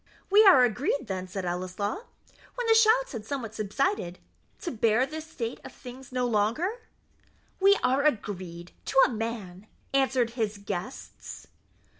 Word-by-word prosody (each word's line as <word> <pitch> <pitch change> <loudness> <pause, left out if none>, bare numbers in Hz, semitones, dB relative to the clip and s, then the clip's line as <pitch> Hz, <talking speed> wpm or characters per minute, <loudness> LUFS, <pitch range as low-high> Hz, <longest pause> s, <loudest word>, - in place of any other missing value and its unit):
"We 420 +2 +8
are 305 -10 +8
agreed, 270 - 0
then," 185 -3 -4
said 190 0 -5
Ellieslaw, 185 - -3 0.5
when - - -3
the 450 - +6
shouts 450 +3 +4
had 230 -5 -6
somewhat 230 -2 -5
subsided, 215 - -1 0.4
"to 360 - -3
bear 230 +1 +2
this 310 +2 -7
state 235 -5 -5
of - - -9
things 255 0 -11
no 250 -1 0
longer?" 245 - 0 0.8
"We 395 +1 +6
are 260 +2 +2
agreed 185 - -2
to - - -3
a - - 0
man," 215 -4 -5 0.3
answered 260 -3 +2
his 220 -3 -2
guests. 200 +4 -7
240 Hz, 145 wpm, -27 LUFS, 205-305 Hz, 0.8 s, We